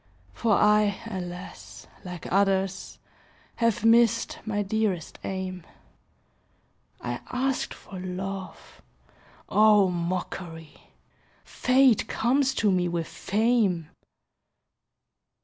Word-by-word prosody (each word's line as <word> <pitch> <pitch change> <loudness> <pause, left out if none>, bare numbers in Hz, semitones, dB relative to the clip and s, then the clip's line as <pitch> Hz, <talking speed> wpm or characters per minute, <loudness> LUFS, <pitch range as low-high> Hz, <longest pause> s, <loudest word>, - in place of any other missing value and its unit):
For 230 -3 +1
I, 210 -1 +3
alas! 180 -4 -8 0.2
like 180 -2 -8
others, 195 -1 +1 0.6
Have 230 -2 +1
missed 230 +6 +4
my 205 -1 0
dearest 200 -5 -2
aim. 185 -2 -4 1.4
I 120 0 -4
asked 260 +1 -1
for 190 - -10
love. 190 +1 -6 0.7
Oh, 210 -2 +5
mockery! 170 -2 -5 0.5
Fate 255 -3 +3
comes 265 +3 +1
to 210 - +2
me 180 -1 +1
with 170 -2 -2
fame! 205 -6 0
195 Hz, 85 wpm, -26 LUFS, 180-225 Hz, 1.4 s, Oh